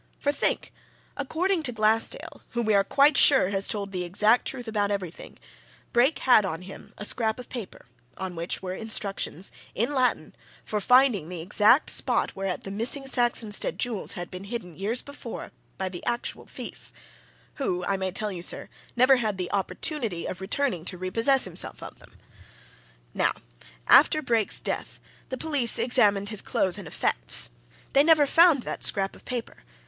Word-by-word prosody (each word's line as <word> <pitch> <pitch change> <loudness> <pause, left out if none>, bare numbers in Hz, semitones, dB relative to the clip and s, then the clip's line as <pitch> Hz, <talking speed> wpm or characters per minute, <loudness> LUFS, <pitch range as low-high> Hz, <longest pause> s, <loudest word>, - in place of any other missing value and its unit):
For, 285 - 0
think! 290 - -1 0.4
according 330 +6 -1
to 275 -5 0
Glassdale, 225 - 0
who, 235 - -1
we 215 -1 +1
are 200 -1 +4
quite 280 +7 +3
sure, 265 -10 +6
has 195 0 0
told 200 -2 -3
the 180 -2 -2
exact 210 +7 +2
truth 245 -3 -3
about 205 -2 -1
everything, 190 -5 -6 0.6
Brake 250 +6 +3
had 245 -5 +4
on 180 -2 -5
him 190 +1 -12
a 210 - -5
scrap 220 0 +2
of 250 - -11
paper, 235 -6 -8 0.3
on 185 -2 -5
which 170 +3 -4
were 185 -1 -4
instructions, 200 -4 -2 0.2
in 235 +7 0
Latin, 255 -2 0 0.3
for 210 -1 -2
finding 250 - +3
the 175 -3 -6
exact 210 - +4
spot - - 0
whereat 195 -2 -4
the 195 - -7
missing 235 +7 +1
Saxonsteade 240 -5 +1
jewels 235 -5 -2
had 175 -1 -7
been 185 +2 -8
hidden, 200 -6 -6
years 210 +7 -1
before, 285 0 -9 0.3
by 190 - -2
the 180 -2 -8
actual 240 0 -4
thief - - -10 0.7
who, 180 -10 -2
I 200 - 0
may 190 -1 -2
tell 210 +3 -3
you, 180 -3 -6
sir, - - -1 0.3
never 255 +2 +5
had 215 -5 -2
the 180 -1 -4
opportunity 205 - -2
of 185 - -6
returning 200 - -1
to 185 - -1
re 185 +1 -5
possess 265 +5 +4
himself 180 -2 -5
of - - -10
them. - - -20 1.0
Now, - - +1 0.5
after 310 0 +6
Brake's 230 -5 +2
death, - - -4 0.3
the 260 - -4
police 280 -6 +2
examined 205 -5 +3
his 215 -2 +2
clothes 185 -2 -1
and - - -9
effects - - +1 0.4
they 280 - +5
never 310 -2 +5
found 325 -3 +4
that - - -6
scrap 195 -1 +1
of - - -18
paper! 245 -2 -6
215 Hz, 175 wpm, -25 LUFS, 190-255 Hz, 1.0 s, sure